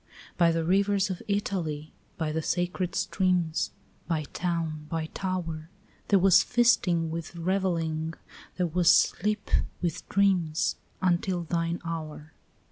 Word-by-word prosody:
By 170 Hz, -2 st, +4 dB
the 165 Hz, 0 st, 0 dB
rivers 195 Hz, +2 st, +2 dB
of 180 Hz, -, -5 dB
Italy, 170 Hz, -7 st, -2 dB, 0.2 s
by 160 Hz, -2 st, -1 dB
the 160 Hz, +1 st, -1 dB
sacred 180 Hz, +2 st, -1 dB
streams, 180 Hz, -3 st, +1 dB, 0.4 s
By 160 Hz, -3 st, 0 dB
town, 165 Hz, -3 st, -2 dB
by 160 Hz, -1 st, -2 dB
tower, 170 Hz, -4 st, -3 dB, 0.4 s
There 200 Hz, -, +5 dB
was 190 Hz, -1 st, +6 dB
feasting 180 Hz, -9 st, +2 dB
with 165 Hz, +1 st, -5 dB
revelling, 165 Hz, -3 st, -1 dB, 0.4 s
there 180 Hz, -, +1 dB
was 175 Hz, 0 st, +2 dB
sleep 210 Hz, 0 st, +2 dB, 0.3 s
with 170 Hz, -3 st, -3 dB
dreams, 185 Hz, -6 st, +2 dB, 0.3 s
Until 180 Hz, 0 st, +1 dB
thine 170 Hz, +1 st, -1 dB
hour. 155 Hz, -2 st, -6 dB
170 Hz, 125 wpm, -28 LUFS, 160-185 Hz, 0.4 s, was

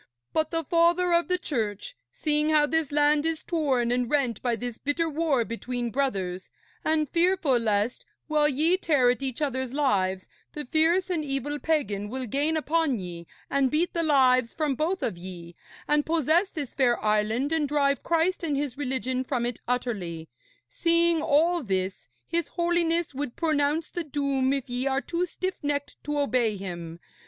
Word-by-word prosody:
But 315 Hz, -1 st, +1 dB
the 330 Hz, -1 st, -1 dB
Father 345 Hz, +3 st, +3 dB
of 340 Hz, 0 st, +3 dB
the 365 Hz, 0 st, +1 dB
Church, 235 Hz, -, -3 dB, 0.2 s
seeing 300 Hz, 0 st, 0 dB
how 305 Hz, -1 st, +4 dB
this 320 Hz, -1 st, -1 dB
land 295 Hz, 0 st, +3 dB
is 325 Hz, -1 st, -2 dB
torn 270 Hz, -8 st, 0 dB
and 245 Hz, -1 st, 0 dB
rent 260 Hz, -7 st, 0 dB
by 240 Hz, -2 st, 0 dB
this 240 Hz, 0 st, -5 dB
bitter 310 Hz, +4 st, 0 dB
war 300 Hz, -6 st, +1 dB
between 240 Hz, +1 st, -4 dB
brothers, 195 Hz, -9 st, -2 dB, 0.3 s
and 310 Hz, -1 st, +1 dB
fearful 335 Hz, -5 st, +2 dB
lest, 215 Hz, +1 st, 0 dB, 0.2 s
while 300 Hz, -1 st, +3 dB
ye 315 Hz, +6 st, +3 dB
tear 285 Hz, -9 st, +3 dB
at 245 Hz, -, -4 dB
each 270 Hz, +1 st, -2 dB
others' 260 Hz, -3 st, -2 dB
lives, 190 Hz, -10 st, +1 dB, 0.3 s
the 300 Hz, -2 st, -5 dB
fierce 335 Hz, +7 st, +2 dB
and 325 Hz, -4 st, 0 dB
evil 285 Hz, +1 st, -3 dB
pagan 210 Hz, -12 st, -1 dB
will 260 Hz, +2 st, -3 dB
gain 290 Hz, +7 st, 0 dB
upon 315 Hz, -3 st, +1 dB
ye 175 Hz, -3 st, -7 dB, 0.2 s
and 275 Hz, -1 st, +2 dB
beat 320 Hz, +6 st, 0 dB
the 335 Hz, -, 0 dB
lives 255 Hz, -6 st, +3 dB
from 305 Hz, -3 st, 0 dB
both 330 Hz, +8 st, -1 dB
of 180 Hz, -7 st, -2 dB
ye, 175 Hz, -2 st, -9 dB, 0.3 s
and 295 Hz, 0 st, +3 dB
possess 330 Hz, +4 st, +2 dB
this 290 Hz, -8 st, -6 dB
fair 245 Hz, -3 st, +2 dB
island 215 Hz, +6 st, +1 dB
and 320 Hz, -2 st, +1 dB
drive 280 Hz, -1 st, +1 dB
Christ 335 Hz, +2 st, +1 dB
and 300 Hz, -4 st, -1 dB
His 285 Hz, -2 st, -3 dB
religion 260 Hz, -1 st, -1 dB
from 250 Hz, -2 st, -1 dB
it 240 Hz, -1 st, -3 dB
utterly 195 Hz, -10 st, -2 dB, 0.4 s
seeing 335 Hz, -, +3 dB
all 320 Hz, +3 st, +3 dB
this, 190 Hz, -, -3 dB, 0.2 s
his 335 Hz, -2 st, -1 dB
Holiness 340 Hz, -2 st, 0 dB
would 265 Hz, -2 st, -4 dB
pronounce 305 Hz, -1 st, +1 dB
the 345 Hz, -, -3 dB
doom 280 Hz, -3 st, 0 dB
if 275 Hz, -2 st, -2 dB
ye 250 Hz, +2 st, -2 dB
are 270 Hz, 0 st, +1 dB
too 350 Hz, +3 st, -2 dB
stiffnecked 290 Hz, -6 st, -3 dB
to 295 Hz, 0 st, -2 dB
obey 250 Hz, -7 st, +1 dB
him. 170 Hz, -3 st, -7 dB
285 Hz, 170 wpm, -26 LUFS, 245-320 Hz, 0.4 s, how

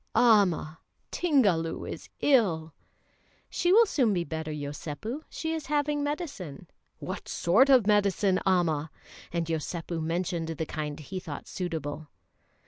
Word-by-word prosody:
"Amma! 195 Hz, -9 st, +4 dB, 0.3 s
Tingalu 200 Hz, -, +2 dB
is -, -, -7 dB
ill!" 175 Hz, -, +3 dB, 0.8 s
"She 350 Hz, -, +1 dB
will 455 Hz, +4 st, +7 dB
soon 255 Hz, -, +2 dB
be 175 Hz, -, 0 dB
better, 160 Hz, 0 st, -5 dB
Yosépu; 150 Hz, -, -5 dB
she 320 Hz, 0 st, -3 dB
is 320 Hz, -2 st, -4 dB
having 295 Hz, 0 st, 0 dB
medicine." 290 Hz, -, -5 dB, 0.3 s
"What -, -, -6 dB
sort 225 Hz, +11 st, +4 dB
of 255 Hz, -6 st, +6 dB
medicine, 200 Hz, -2 st, +3 dB
Amma?" 165 Hz, -5 st, +1 dB, 0.4 s
and 170 Hz, -1 st, -1 dB
Yosépu 165 Hz, +1 st, -3 dB
mentioned 170 Hz, +1 st, -2 dB
the 160 Hz, 0 st, -3 dB
kind 150 Hz, -2 st, -4 dB
he 185 Hz, +5 st, -6 dB
thought 150 Hz, -5 st, -8 dB
suitable. 155 Hz, -4 st, -4 dB
175 Hz, 130 wpm, -28 LUFS, 160-245 Hz, 0.8 s, will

